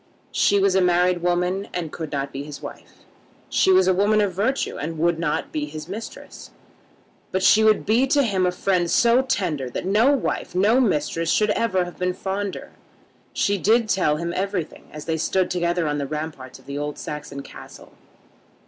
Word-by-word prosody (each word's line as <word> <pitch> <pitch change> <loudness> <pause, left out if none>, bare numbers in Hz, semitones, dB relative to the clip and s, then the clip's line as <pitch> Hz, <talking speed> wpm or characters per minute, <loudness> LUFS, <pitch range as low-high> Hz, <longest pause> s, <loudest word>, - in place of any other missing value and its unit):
She 205 - +3
was 195 -1 +3
a 190 - +3
married 180 0 +2
woman, 180 +3 0
and 170 -4 -3
could 160 -3 -6
not 140 -1 -3
be 135 - -4
his 145 0 -8
wife. - - -11 0.4
She 190 - +3
was 185 0 +5
a 185 - +4
woman 205 +3 +3
of 200 -3 +1
virtue, 225 +9 -1
and 160 +2 -4
would 170 +1 +1
not 155 -3 -2
be 150 -1 -2
his 155 +1 -8
mistress. 215 +5 -9 0.8
But 190 0 -1
she 220 +3 +6
would 215 -1 +3
be 235 +6 +3
to 285 +1 +3
him 190 -6 +1
a - - +1
friend 180 -1 0
so 235 +6 +4
tender 180 - -2
that 125 - -5
no 215 +8 +4
wife, 275 -9 -2
no 210 +7 +4
mistress 165 - 0
should 210 0 +2
ever 190 -5 +1
have 175 - -11
been 180 0 -1
fonder! 195 +1 -4 0.6
She 200 -1 0
did 225 +4 +3
tell 180 -7 +1
him 170 +1 -3
everything 190 -3 -4
as 150 0 -9
they 160 -1 -1
stood 185 +3 0
together 175 -1 0
on 145 0 -1
the 140 - -3
ramparts 150 -4 -6
of - - -21
the 140 +1 -5
old 145 0 -4
Saxon 145 -2 -7
castle. - - -13
180 Hz, 195 wpm, -23 LUFS, 155-200 Hz, 0.8 s, she